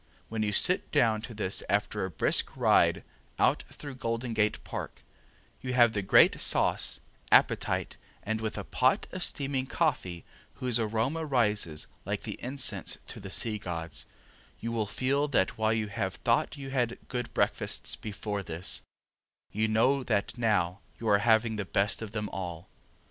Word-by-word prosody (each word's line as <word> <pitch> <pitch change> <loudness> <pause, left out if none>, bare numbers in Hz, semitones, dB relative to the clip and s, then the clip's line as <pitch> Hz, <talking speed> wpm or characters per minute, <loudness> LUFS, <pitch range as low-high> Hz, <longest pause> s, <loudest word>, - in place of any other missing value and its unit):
When 110 -1 -2
you 105 -1 +1
sit 180 - +3
down 115 -7 +3
to 115 0 -8
this 100 -2 -1
after 105 +1 0
a 95 - -2
brisk 80 - +2
ride - - +4 0.3
out - - +3
through 145 -2 -9
Golden 115 -1 -3
Gate 105 -1 +2
Park, - - -7 0.6
you 125 -1 -3
have 120 -2 +5
the 100 - 0
great 95 - +5
sauce, - - +3 0.3
appetite, - - +3 0.3
and 110 +1 -2
with 110 -1 -3
a 100 - -3
pot 130 +6 +2
of 185 -1 -3
steaming 135 -2 -1
coffee 125 - -1 0.3
whose 125 -2 0
aroma 115 +9 0
rises 105 - +1 0.2
like - - -3
the - - -6
incense 130 +2 -1
to - - -7
the 95 - -8
Sea 105 +2 0
Gods, 85 -3 -5 0.5
you 115 - -4
will 110 -3 -1
feel 140 +6 0
that 120 -5 +1
while 110 0 +2
you 110 -1 0
have 100 -2 -3
thought 120 +4 0
you 135 -1 -7
had 120 -3 0
good 125 -2 -4
breakfasts - - 0
before 105 -1 -4
this, 85 -1 -3 0.7
you 110 +2 +1
know 130 +5 +2
that 100 -4 -1
now 100 -6 +1 0.2
you 115 - -5
are 100 -1 +5
having 110 0 +3
the 105 - -1
best 100 +3 +1
of 110 -2 -6
them 105 -2 -3
all. 85 -3 -6
110 Hz, 165 wpm, -29 LUFS, 100-125 Hz, 0.7 s, have